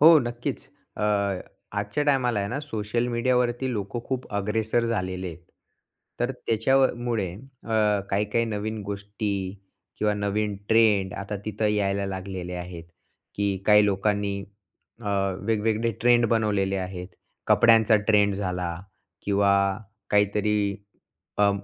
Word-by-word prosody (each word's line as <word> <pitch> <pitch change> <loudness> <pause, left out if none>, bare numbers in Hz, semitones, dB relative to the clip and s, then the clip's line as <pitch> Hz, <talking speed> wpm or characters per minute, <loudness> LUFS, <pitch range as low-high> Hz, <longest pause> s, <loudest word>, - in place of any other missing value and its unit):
हो, 160 +2 +9
नक्कीच. 120 -1 -4 0.3
अ, - - -3 0.8
आजच्या 150 - -1
टायमाला 130 -6 +2
आहे 100 - -2
ना, 135 - -2
सोशल 115 -3 -2
मीडियावरती 125 +1 +1
लोकं 105 +2 -3
खूप 130 -1 -3
अग्रेसर 110 +3 0
झालेले 95 -5 -2
आहेत. 85 +1 -10 0.8
तर 120 +2 +1
त्याच्याव 130 +2 +2 0.2
मुळे 110 -7 -1
अ, 110 -4 -1
काही-काही 105 +3 +1
नवीन 110 0 -3
गोष्टी 100 -1 -3 0.4
किंवा 105 0 +1
नवीन 105 0 -1
ट्रेंड 105 -4 +4
आता 100 +1 -5
तिथं 110 0 -1
यायला 100 -1 0
लागलेले 95 -2 -5
आहेत. 90 -1 -6 0.5
की 100 -1 0
काही 105 -1 +6
लोकांनी 100 0 0 0.6
अ, - - -10 0.4
वेगवेगळे 115 +1 +1
ट्रेंड 120 0 +5
बनवलेले 105 -4 +1
आहेत. 90 -1 -5 0.4
कपड्यांचा 115 -1 +6
ट्रेंड 105 -2 +4
झाला 90 -3 -2 0.5
किंवा 100 0 +3 0.6
काहीतरी 105 0 +2 0.6
अ, 105 0 +5
105 Hz, 120 wpm, -26 LUFS, 100-115 Hz, 0.8 s, हो